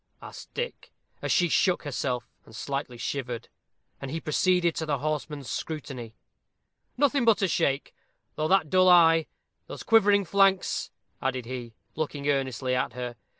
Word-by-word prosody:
asked -, -, -11 dB
Dick, 485 Hz, 0 st, -5 dB, 0.3 s
as -, -, -2 dB
she 175 Hz, -, +4 dB
shook 180 Hz, +2 st, +2 dB
herself, 130 Hz, -4 st, -2 dB, 0.2 s
and 110 Hz, -, -15 dB
slightly 135 Hz, -1 st, -4 dB
shivered. 120 Hz, -1 st, -4 dB, 0.5 s
And 135 Hz, -, -5 dB
he 160 Hz, +4 st, -3 dB
proceeded 175 Hz, +2 st, +2 dB
to 160 Hz, -, -2 dB
the 145 Hz, -2 st, +1 dB
horseman's 150 Hz, -1 st, -3 dB
scrutiny. 125 Hz, -5 st, -5 dB, 0.8 s
"Nothing 280 Hz, -1 st, +3 dB
but 225 Hz, -3 st, +4 dB
a -, -, +4 dB
shake; 145 Hz, -5 st, 0 dB, 0.4 s
though 155 Hz, -, 0 dB
that 175 Hz, -4 st, +2 dB
dull 185 Hz, 0 st, +5 dB
eye 165 Hz, -2 st, +6 dB, 0.4 s
those -, -, -8 dB
quivering 205 Hz, -3 st, +4 dB
flanks 195 Hz, +1 st, +2 dB, 0.2 s
" -, -, -45 dB
added 130 Hz, -2 st, -2 dB
he, 120 Hz, -2 st, -7 dB, 0.2 s
looking 145 Hz, -2 st, -3 dB
earnestly 130 Hz, -2 st, 0 dB
at 125 Hz, -1 st, 0 dB
her. 125 Hz, 0 st, -5 dB
150 Hz, 150 wpm, -27 LUFS, 130-180 Hz, 0.8 s, eye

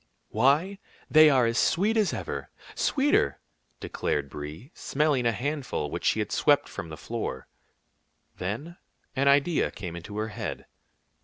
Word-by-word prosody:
"Why, 150 Hz, -, +2 dB, 0.3 s
they 155 Hz, 0 st, +8 dB
are 130 Hz, -4 st, +4 dB
as 115 Hz, 0 st, +1 dB
sweet 210 Hz, +6 st, +2 dB
as 215 Hz, -4 st, +2 dB
ever, -, -, -5 dB, 0.2 s
sweeter," 270 Hz, -, +2 dB, 0.4 s
declared 70 Hz, -2 st, -2 dB
Brie, 75 Hz, -, -8 dB
smelling 140 Hz, -4 st, 0 dB
a -, -, +3 dB
handful 130 Hz, -, -3 dB
which -, -, -4 dB
she -, -, +3 dB
had -, -, -2 dB
swept -, -, +3 dB
from 80 Hz, -, -7 dB
the 80 Hz, -, -8 dB
floor. 65 Hz, -2 st, -5 dB, 0.9 s
Then 120 Hz, -, -4 dB, 0.4 s
an 140 Hz, +1 st, +1 dB
idea 145 Hz, +4 st, +3 dB
came 85 Hz, -4 st, -7 dB
into 85 Hz, +5 st, -8 dB
her 110 Hz, +1 st, -2 dB
head. 105 Hz, -, -5 dB
130 Hz, 145 wpm, -27 LUFS, 90-155 Hz, 0.9 s, they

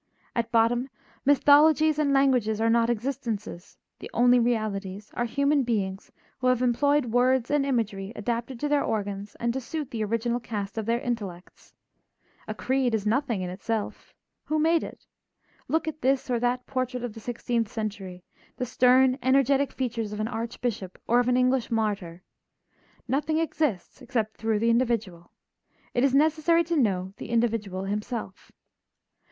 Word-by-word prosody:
At 230 Hz, -1 st, -1 dB
bottom 240 Hz, +3 st, +2 dB, 0.4 s
mythologies 300 Hz, +2 st, +5 dB
and 290 Hz, -2 st, +2 dB
languages 255 Hz, -6 st, +2 dB
are 225 Hz, 0 st, +2 dB
not 230 Hz, 0 st, +3 dB
existences; 230 Hz, -6 st, -4 dB, 0.2 s
the -, -, -8 dB
only 245 Hz, +1 st, +5 dB
realities 210 Hz, -4 st, -2 dB
are 240 Hz, -, -1 dB
human 280 Hz, +4 st, +2 dB
beings 200 Hz, -5 st, -2 dB, 0.3 s
who 255 Hz, -, 0 dB
have 255 Hz, 0 st, +2 dB
employed 285 Hz, +3 st, +2 dB
words 250 Hz, +1 st, +2 dB
and 290 Hz, -1 st, +2 dB
imagery 210 Hz, -6 st, -1 dB
adapted 235 Hz, +3 st, -3 dB
to 295 Hz, -, 0 dB
their 290 Hz, -1 st, +2 dB
organs 205 Hz, -1 st, -3 dB
and 235 Hz, 0 st, 0 dB
to 265 Hz, -, -3 dB
suit 300 Hz, +2 st, -5 dB
the 225 Hz, -2 st, -2 dB
original 230 Hz, +3 st, -1 dB
cast 215 Hz, -3 st, -5 dB
of 220 Hz, -, -5 dB
their 235 Hz, +1 st, +1 dB
intellects. 205 Hz, -8 st, -6 dB, 0.7 s
A 215 Hz, -, -4 dB
creed 255 Hz, 0 st, 0 dB
is 210 Hz, -2 st, -3 dB
nothing 230 Hz, -3 st, 0 dB
in 180 Hz, -, -4 dB
itself. 215 Hz, +3 st, -4 dB, 0.3 s
Who 310 Hz, -, 0 dB
made 325 Hz, +2 st, +3 dB
it? -, -, -10 dB, 0.6 s
Look 320 Hz, 0 st, 0 dB
at 310 Hz, 0 st, -5 dB
this 265 Hz, -1 st, +1 dB
or 240 Hz, -, +1 dB
that 245 Hz, +1 st, 0 dB
portrait 255 Hz, -1 st, -3 dB
of 240 Hz, -3 st, -4 dB
the 225 Hz, -, -10 dB
sixteenth 235 Hz, -1 st, -2 dB
century, 200 Hz, -5 st, -5 dB, 0.3 s
the 250 Hz, -, -2 dB
stern, 255 Hz, +1 st, +4 dB
energetic 275 Hz, +2 st, +3 dB
features 230 Hz, -4 st, -3 dB
of 210 Hz, -, -5 dB
an 215 Hz, -, -1 dB
archbishop 230 Hz, -4 st, -4 dB
or 240 Hz, +2 st, +3 dB
of 245 Hz, -, +1 dB
an 250 Hz, 0 st, +3 dB
English 255 Hz, -1 st, +2 dB
martyr. 200 Hz, -6 st, -2 dB, 0.8 s
Nothing 295 Hz, +5 st, 0 dB
exists 300 Hz, -, -2 dB
except 230 Hz, -4 st, -2 dB
through 220 Hz, -1 st, 0 dB
the 230 Hz, +2 st, +2 dB
individual; 230 Hz, -8 st, -1 dB, 0.6 s
it 245 Hz, -, +1 dB
is 275 Hz, -1 st, +3 dB
necessary 315 Hz, +3 st, +3 dB
to 340 Hz, +1 st, -2 dB
know 190 Hz, -, 0 dB
the -, -, -8 dB
individual 225 Hz, -5 st, 0 dB
himself. 210 Hz, 0 st, -5 dB
235 Hz, 160 wpm, -26 LUFS, 215-265 Hz, 0.8 s, mythologies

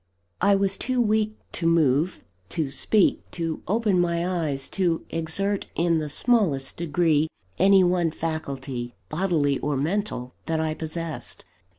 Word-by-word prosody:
I 200 Hz, -, +5 dB
was 195 Hz, 0 st, 0 dB
too 255 Hz, 0 st, 0 dB
weak 215 Hz, -1 st, +1 dB
to 165 Hz, -, -1 dB
move, 160 Hz, 0 st, +2 dB, 0.3 s
to 155 Hz, -4 st, -2 dB
speak, 200 Hz, +8 st, +2 dB
to 165 Hz, -2 st, -3 dB
open 210 Hz, -1 st, +2 dB
my 170 Hz, 0 st, 0 dB
eyes, 155 Hz, -7 st, -1 dB
to 175 Hz, -4 st, 0 dB
exert 195 Hz, +5 st, 0 dB
in 170 Hz, -1 st, +2 dB
the 150 Hz, -1 st, -3 dB
smallest 155 Hz, -, +1 dB
degree 160 Hz, -2 st, +2 dB, 0.3 s
any 195 Hz, +1 st, +6 dB
one 175 Hz, -2 st, +2 dB
faculty, 135 Hz, -6 st, -4 dB
bodily 155 Hz, -5 st, +1 dB
or 145 Hz, -1 st, -1 dB
mental, 150 Hz, -5 st, -2 dB
that 160 Hz, -1 st, 0 dB
I 160 Hz, -1 st, 0 dB
possessed. 160 Hz, 0 st, -5 dB
165 Hz, 135 wpm, -25 LUFS, 150-195 Hz, 0.3 s, any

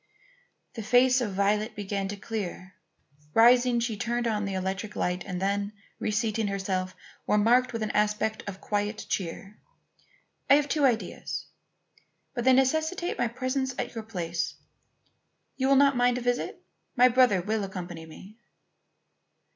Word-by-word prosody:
The 225 Hz, -, -6 dB
face 250 Hz, +3 st, +4 dB
of 205 Hz, -5 st, -2 dB
Violet 210 Hz, +3 st, +1 dB
began 200 Hz, -1 st, -3 dB
to 205 Hz, -, -4 dB
clear. 195 Hz, -3 st, -5 dB, 0.6 s
Rising, 240 Hz, +1 st, +5 dB
she 230 Hz, -2 st, -1 dB
turned 240 Hz, +3 st, -2 dB
on 210 Hz, -3 st, 0 dB
the 195 Hz, -1 st, -3 dB
electric 190 Hz, +3 st, -3 dB
light, 180 Hz, 0 st, -1 dB
and 180 Hz, -2 st, -3 dB
then, 200 Hz, +2 st, -1 dB, 0.3 s
reseating 215 Hz, 0 st, 0 dB
herself, 190 Hz, -2 st, -2 dB, 0.3 s
remarked 235 Hz, +5 st, +3 dB
with 230 Hz, -2 st, -3 dB
an 215 Hz, -, -2 dB
aspect 210 Hz, +1 st, 0 dB
of 195 Hz, -1 st, -6 dB
quiet 205 Hz, +1 st, -2 dB
cheer: 195 Hz, +3 st, -4 dB, 0.9 s
"I 280 Hz, -, +9 dB
have 290 Hz, 0 st, +2 dB
two 290 Hz, 0 st, +2 dB
ideas; 235 Hz, -4 st, -1 dB, 0.9 s
but 240 Hz, -1 st, -3 dB
they 260 Hz, -, +6 dB
necessitate 315 Hz, +7 st, +1 dB
my -, -, +2 dB
presence 255 Hz, +2 st, -2 dB
at -, -, -3 dB
your 225 Hz, -2 st, -5 dB
place. 175 Hz, -6 st, -3 dB, 1.0 s
You 265 Hz, -, 0 dB
will 275 Hz, -, +5 dB
not 280 Hz, 0 st, +5 dB
mind 245 Hz, 0 st, +3 dB
a -, -, -3 dB
visit? 245 Hz, 0 st, -2 dB, 0.3 s
My 250 Hz, +1 st, +7 dB
brother 250 Hz, -5 st, +4 dB
will 210 Hz, +4 st, -1 dB
accompany 175 Hz, -4 st, -7 dB
me." 195 Hz, +7 st, -13 dB
215 Hz, 145 wpm, -27 LUFS, 195-245 Hz, 1.0 s, I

